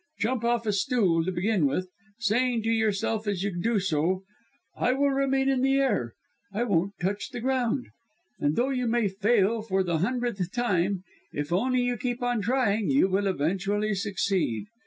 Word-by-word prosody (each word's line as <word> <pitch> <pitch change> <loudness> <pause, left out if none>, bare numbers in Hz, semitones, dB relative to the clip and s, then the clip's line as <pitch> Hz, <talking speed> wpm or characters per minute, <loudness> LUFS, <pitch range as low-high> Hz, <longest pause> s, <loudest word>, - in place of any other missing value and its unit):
Jump 235 +1 -1
off 235 -1 +1
a 210 - +1
stool 195 -6 +2
to 185 - -1
begin 185 -2 +1
with, 185 +7 -1 0.3
saying 235 +1 +1
to 225 - -1
yourself 220 0 0
as 195 -2 -1
you 200 -3 -2
do 225 0 +1
so: 185 +1 0 0.5
'I 250 - +1
will 280 +1 +2
remain 270 0 +1
in 270 -2 +2
the 270 +1 +3
air. 220 - 0 0.4
I 210 +4 -1
won't 200 -3 0
touch 195 +3 -2
the 250 - -6
ground,' 250 0 0 0.5
and 145 +1 +1
though 255 +3 +1
you 250 -2 -1
may 230 -2 +2
fail 210 +2 +2
for 195 -3 0
the 170 -3 0
hundredth 230 -3 -1
time, 195 -5 0 0.3
if 145 +3 -3
only 255 +7 +2
you 245 0 0
keep 245 +1 -3
on 245 -2 0
trying 220 -2 +1
you 270 -8 +4
will 195 +2 +1
eventually 195 +5 0
succeed. 195 - -1
215 Hz, 180 wpm, -27 LUFS, 190-245 Hz, 0.5 s, you